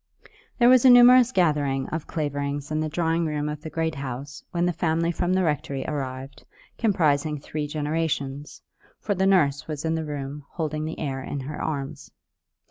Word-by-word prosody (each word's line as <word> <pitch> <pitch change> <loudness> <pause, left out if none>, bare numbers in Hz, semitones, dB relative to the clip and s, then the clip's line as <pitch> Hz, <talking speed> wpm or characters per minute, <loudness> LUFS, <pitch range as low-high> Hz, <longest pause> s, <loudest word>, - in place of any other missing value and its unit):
There 240 - +5
was 255 -1 +6
a 260 - +8
numerous 245 0 +8
gathering 145 - +1
of 160 -1 -4
Claverings 145 -1 -3
in 155 - 0
the 155 0 -1
drawing 165 +1 0
room 150 -1 -2
of 150 0 -5
the 160 - -7
Great 160 0 -1
House 140 0 -6
when 175 -1 0
the 175 - +1
family 165 +1 0
from 175 +1 -1
the 185 0 +2
rectory 140 -4 -2
arrived 135 -2 -5 0.4
comprising 155 -8 +1
three 150 +1 -4
generations; 145 -2 -3 0.4
for 205 - -1
the 190 0 +1
nurse 145 -8 +2
was 155 -1 -5
in 160 - +1
the 160 0 -1
room 145 -1 -5
holding 155 -2 -3
the 160 - -5
heir 135 -3 -3
in 140 +1 -5
her 150 +3 -6
arms. 145 -1 -4
155 Hz, 180 wpm, -25 LUFS, 140-165 Hz, 0.4 s, a